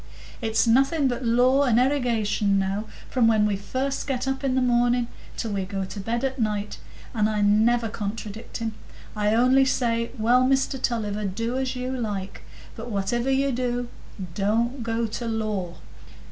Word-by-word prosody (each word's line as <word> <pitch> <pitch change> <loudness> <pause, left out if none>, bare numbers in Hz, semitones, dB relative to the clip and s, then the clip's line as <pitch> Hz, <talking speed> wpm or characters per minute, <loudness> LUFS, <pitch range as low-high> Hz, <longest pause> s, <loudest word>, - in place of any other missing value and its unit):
It's 225 0 +2
nothing 270 +5 +3
but 250 0 -2
law 250 +3 +4
and 245 -4 +3
erigation 230 -6 +1
now, 195 +2 -1 0.2
from 245 -3 +2
when 215 -2 +4
we 210 -1 +1
first 260 +9 -3
get 265 -1 -2
up 270 +1 -2
in 265 -2 +1
the - - +3
morning 245 -1 +2 0.3
till 225 - -3
we 195 -1 -1
go 195 0 -3
to 190 +2 -8
bed 230 +5 -2
at 265 0 -2
night; 210 -2 -2 0.3
and 215 -2 +2
I 210 -1 0
never 225 +3 +3
contradict 215 0 -5
him; 225 -1 -3 0.4
I 210 +1 +1
only 255 +3 +5
say, 235 -3 0
'Well, 240 +3 +4
Mr 270 0 +1
Tulliver, 210 -3 -1
do 230 +6 -2
as 260 -1 -1
you 250 +1 -3
like; 205 -5 -4 0.3
but 225 +2 -7
whativer 235 +5 -1
you 270 +1 +2
do, 245 -1 -2 0.4
don't 230 +7 0
go 230 0 -1
to 230 +2 -4
law." 215 -6 -2
230 Hz, 170 wpm, -25 LUFS, 210-255 Hz, 0.4 s, only